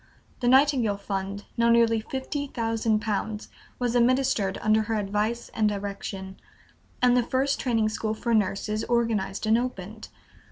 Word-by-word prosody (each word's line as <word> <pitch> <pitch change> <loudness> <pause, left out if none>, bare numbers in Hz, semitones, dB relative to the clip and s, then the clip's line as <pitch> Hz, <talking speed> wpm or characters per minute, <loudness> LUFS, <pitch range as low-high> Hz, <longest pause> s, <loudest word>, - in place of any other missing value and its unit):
The 245 - -1
Nightingale 260 -5 +4
fund, 200 0 -4
now 235 0 +3
nearly 230 -1 +4
fifty 270 +4 -4
thousand 225 -3 0
pounds, 210 0 -3 0.3
was 245 -2 -1
administered 240 -5 +2
under 215 +1 +3
her 220 +1 -2
advice 210 +3 -1
and 215 -1 +2
direction, 195 -1 -5 0.7
and 250 0 +5
the 250 - +4
first 265 +4 0
Training 225 -4 +1
School 215 0 -2
for 235 +1 -1
Nurses 210 +1 0
organized 220 -5 0
and 220 +2 +4
opened. 220 -3 -6
220 Hz, 145 wpm, -26 LUFS, 205-240 Hz, 0.7 s, and